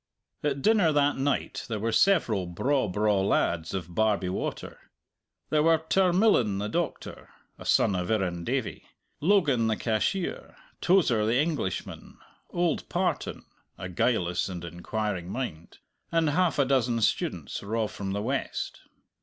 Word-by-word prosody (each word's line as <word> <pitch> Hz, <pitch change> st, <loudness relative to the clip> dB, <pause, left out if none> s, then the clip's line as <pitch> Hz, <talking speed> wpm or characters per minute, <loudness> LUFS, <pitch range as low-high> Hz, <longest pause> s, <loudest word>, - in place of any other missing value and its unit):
At 140 Hz, -2 st, -1 dB
dinner 210 Hz, -7 st, +4 dB
that 145 Hz, -1 st, +2 dB
night 140 Hz, +1 st, -1 dB
there 110 Hz, -, -2 dB
were 115 Hz, +2 st, -1 dB
several 115 Hz, -, +3 dB
braw, 130 Hz, +9 st, 0 dB
braw 105 Hz, +1 st, +1 dB
lads 85 Hz, -3 st, 0 dB
of 90 Hz, -2 st, -5 dB
Barbie 105 Hz, -2 st, +1 dB
Water. 95 Hz, -, -4 dB, 0.7 s
There 155 Hz, -1 st, +3 dB
were 165 Hz, +1 st, +5 dB
Tarmillan 175 Hz, -, +3 dB
the 105 Hz, +1 st, -2 dB
doctor -, -, -4 dB, 0.3 s
(a -, -, -10 dB
son 100 Hz, -, +3 dB
of 90 Hz, -1 st, -2 dB
Irrendavie), 90 Hz, -6 st, -1 dB, 0.4 s
Logan 150 Hz, -, +3 dB
the 110 Hz, -, +1 dB
cashier, 120 Hz, -, -2 dB, 0.3 s
Tozer 160 Hz, -, +3 dB
the 115 Hz, +2 st, +2 dB
Englishman, 145 Hz, -, -3 dB, 0.3 s
old 175 Hz, -1 st, -1 dB
Partan -, -, -2 dB, 0.3 s
a 90 Hz, -, -6 dB
guileless 90 Hz, -3 st, 0 dB
and 90 Hz, -2 st, -6 dB
inquiring 90 Hz, +2 st, -4 dB
mind 95 Hz, -9 st, -5 dB, 0.3 s
and 165 Hz, -3 st, +2 dB
half 180 Hz, +2 st, +1 dB
a 140 Hz, -, +3 dB
dozen 125 Hz, -3 st, +1 dB
students -, -, -1 dB
raw 110 Hz, +2 st, -1 dB
from 100 Hz, -2 st, -5 dB
the 100 Hz, +1 st, -2 dB
west. 135 Hz, +4 st, -3 dB
115 Hz, 135 wpm, -27 LUFS, 95-150 Hz, 0.7 s, were